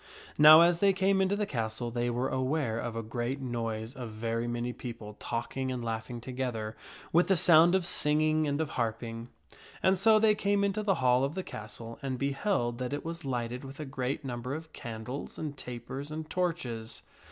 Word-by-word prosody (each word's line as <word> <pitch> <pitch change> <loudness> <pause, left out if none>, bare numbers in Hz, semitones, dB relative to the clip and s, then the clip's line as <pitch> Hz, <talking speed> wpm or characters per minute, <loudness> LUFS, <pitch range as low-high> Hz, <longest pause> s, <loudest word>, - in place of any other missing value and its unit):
Now 155 +2 +10
as 170 0 +4
they 195 0 +4
came 190 +1 +2
into 190 +1 +2
the 210 0 0
castle, 115 - -3
they 120 +1 -1
were 125 +2 -1
aware 130 -3 0
of 120 -1 -4
a 115 - -3
great 120 +4 -3
noise 115 -3 -3
of 125 -5 -6
very 115 +2 -2
many 120 +1 -2
people 115 -4 -8
talking 130 +3 -3
and 125 -2 -4
laughing 115 +1 -4
together, 120 -3 -4 0.4
with 175 +2 +5
the 190 - +3
sound 170 +2 +6
of 190 -2 +1
singing 155 -1 +2
and 145 +1 -1
of 160 -2 -1
harping. 115 0 -3 0.5
And 190 0 +4
so 220 +2 +6
they 215 0 +5
came 200 -1 +1
into 200 +1 0
the 200 -2 +2
hall 125 +1 +5
of 140 +4 -1
the 190 - -2
castle 115 -1 -8
and 130 -2 -3
beheld 140 - 0
that 125 +1 -3
it 145 - -4
was 165 -1 -5
lighted 125 -1 -3
with 135 +2 -9
a 155 - -4
great 135 +1 -3
number 125 +1 -4
of 160 0 -9
candles 115 +4 -6
and 150 -2 -4
tapers 125 +3 -7
and 155 0 -5
torches. 145 -12 -3
130 Hz, 195 wpm, -30 LUFS, 120-160 Hz, 0.5 s, Now